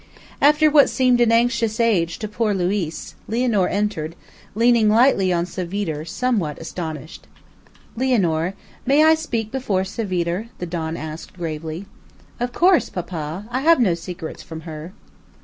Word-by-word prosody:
After 300 +2 +5
what 290 -2 +6
seemed 250 -2 +3
an 235 -1 +4
anxious 230 -1 +2
age 185 -8 +2
to 215 - -4
poor 210 0 0
Luiz, 180 -3 -2 0.2
Lianor 225 -4 +1
entered, 200 -6 -2 0.4
leaning 230 -1 +4
lightly 220 -4 +4
on 170 -1 +1
Savitre, 180 -4 -4
somewhat 190 - -1
astonished. 160 -2 -7 0.7
"Lianor, 195 -9 +1 0.3
may 280 +4 +4
I 315 0 +7
speak 235 -9 -2
before 215 -8 0
Savitre?" 190 0 -2
the 180 - -4
don 165 -1 -4
asked 155 +3 -8
gravely. 165 +1 -5 0.5
"Of 245 +1 -2
course, 355 +5 +3
papa. 170 +1 -5
I 255 +2 -1
have 330 +1 +5
no 205 -8 +3
secrets 170 -1 -7
from 160 -1 -8
her." 160 +1 -8
195 Hz, 140 wpm, -21 LUFS, 170-240 Hz, 0.7 s, I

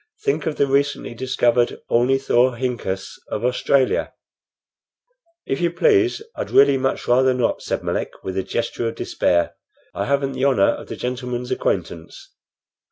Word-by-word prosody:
Think 415 - 0
of 155 - -1
the 140 - +2
recently 140 -2 0
discovered 120 -1 +1
ornithorhynchus 120 -5 +1
of 105 - -3
Australia!" 130 +1 +1 1.3
"If 135 - -2
you 170 - +2
please, 385 - +2
I'd - - -4
really 140 0 +5
much 135 0 -1
rather 130 +1 +4
not," 125 -2 0
said - - -3
Melick - - -3
with 95 - -4
a 95 - +1
gesture 115 +3 -2
of 115 - -4
despair. 85 -1 0 0.4
"I - - -2
haven't 140 -1 0
the 130 - -3
honor 130 -8 +4
of - - -7
the - - -6
gentleman's 125 0 -4
acquaintance." 80 -1 -3
125 Hz, 145 wpm, -21 LUFS, 120-140 Hz, 1.3 s, really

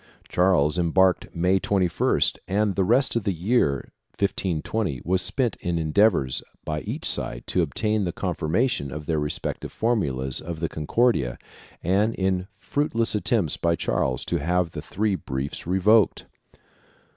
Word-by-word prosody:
Charles 90 -3 +2
embarked 90 +2 +3
May 90 +3 +2
21st 95 -3 +1
and 100 +1 +1
the 95 - +1
rest 120 +8 +2
of 115 - 0
the 100 - +1
year 85 - 0 0.3
1520 95 - -1
was 95 +1 +2
spent 125 +1 0
in 85 -3 -2
endeavors 80 - +2 0.2
by 75 -1 -2
each - - -5
side - - -2
to - - +1
obtain 105 -1 0
the 90 - -1
confirmation 90 - -1
of 75 0 -6
their 80 -1 0
respective 75 +1 -2
formulas 70 - -1
of 85 -1 -6
the 80 -1 -1
Concordia 80 - +1 0.5
and 100 +6 +2
in 95 -1 0
fruitless 115 -1 0
attempts 105 -5 +1
by 85 0 +1
Charles 65 -5 -1
to - - 0
have 85 +2 0
the 75 - -6
three 105 +6 -1
briefs 70 -4 -4
revoked. 100 +4 +3
90 Hz, 145 wpm, -24 LUFS, 80-105 Hz, 0.5 s, embarked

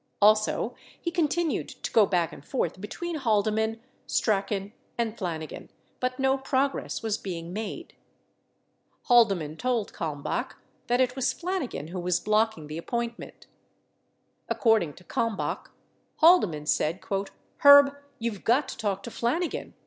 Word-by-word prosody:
Also 215 +1 +3 0.3
he 340 - -3
continued 335 -1 0
to - - -6
go 215 -3 +5
back 175 -4 0
and - - -11
forth 175 +4 -2
between 335 +11 -4
Haldeman, 220 -2 +1 0.3
Strachan, 200 -1 0 0.2
and 230 -2 -1
Flanigan 165 -7 -5 0.3
but 255 0 -1
no 265 0 +2
progress 270 -1 -1
was 220 -2 -1
being 170 -2 -6
made. 220 - -5 1.1
Haldeman 195 - +3
told 245 -2 -1
Kalmbach 150 -4 -3 0.3
that 245 +2 +2
it 250 -1 +1
was 265 -2 +1
Flanigan 335 - -3
who 180 +1 -5
was 180 0 +1
blocking 215 -6 +1
the 155 +2 -6
appointment. 235 +5 -5 1.0
According 220 - +2
to 180 - -16
Kalmbach, 230 0 -2 0.5
Haldeman 210 - +4
said, 155 +3 +1 0.6
"Herb, 285 0 +8 0.2
you've 225 -4 -4
got 260 +4 +2
to - - -6
talk 200 -3 -2
to 235 - -7
Flanigan. 310 +11 -2
220 Hz, 130 wpm, -27 LUFS, 185-260 Hz, 1.1 s, Herb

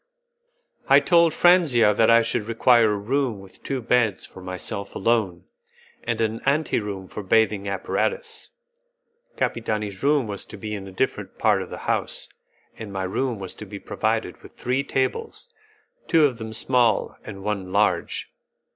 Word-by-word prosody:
I - - +8
told 170 -2 +4
Franzia 150 - +4
that 110 +2 +3
I 115 0 +6
should 115 -1 -1
require 115 -1 +4
a - - -1
room 120 +1 -1
with 95 -1 -15
two 135 -3 -4
beds 115 -4 +1
for 95 - -13
myself 90 +2 -5
alone, 95 -5 0 0.6
and 115 -1 -2
an 110 0 -1
ante 145 +1 +1
room 100 -3 -6
with 100 -3 -7
bathing 105 -3 +2
apparatus. 450 - -3 0.9
Capitani's 105 -4 -2
room 145 -2 +2
was 100 -2 -5
to 110 - -10
be 105 +2 -6
in 100 -2 -6
a - - -9
different 95 - -2
part - - +2
of - - -7
the - - -7
house, - - -2 0.5
and 110 -3 -7
my 95 -1 -3
room 120 +6 -1
was 95 -2 -6
to - - -9
be - - -7
provided - - -2
with - - -14
three 130 +2 -1
tables, 450 - -3 0.5
two 160 -3 +5
of 125 -4 -1
them 110 -1 -6
small 120 -1 +1
and 100 -3 -9
one 100 -3 -3
large. 100 -3 0
110 Hz, 165 wpm, -24 LUFS, 100-130 Hz, 0.9 s, I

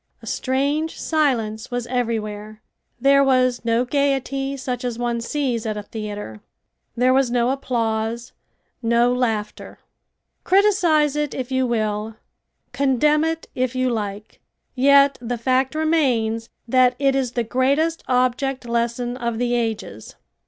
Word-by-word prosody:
A - - -14
strange 285 +5 -1
silence 235 -9 0
was 245 -2 -3
everywhere. 215 -3 -3 0.4
There 275 +2 +5
was 255 -3 +2
no 230 +1 +1
gaiety 275 0 -1
such 250 -2 -4
as 245 -2 -3
one 240 -1 -2
sees 245 -2 -2
at 215 -1 -3
a 210 - -5
theater. 205 - -7 0.6
There 255 +2 +4
was 265 -1 +3
no 240 +1 +1
applause, 235 -3 -2 0.5
no 235 +1 +3
laughter. 225 -4 -3 0.7
Criticise 355 -7 +3
it 295 -1 -2
if 260 0 -5
you 260 -1 +1
will, 215 -1 -2 0.6
condemn 280 +4 +2
it 325 0 -2
if 255 0 -1
you 255 0 +1
like, 210 -2 -5 0.3
yet 280 +1 +5
the 240 0 -3
fact 260 +4 +1
remains 250 -8 +1 0.2
that 255 +1 +4
it 275 -1 +2
is 260 -3 -1
the 240 - 0
greatest 280 +8 0
object 255 +1 0
lesson 235 +1 -1
of 235 -2 -2
the 245 0 0
ages. 220 - -3
250 Hz, 135 wpm, -22 LUFS, 230-275 Hz, 0.7 s, There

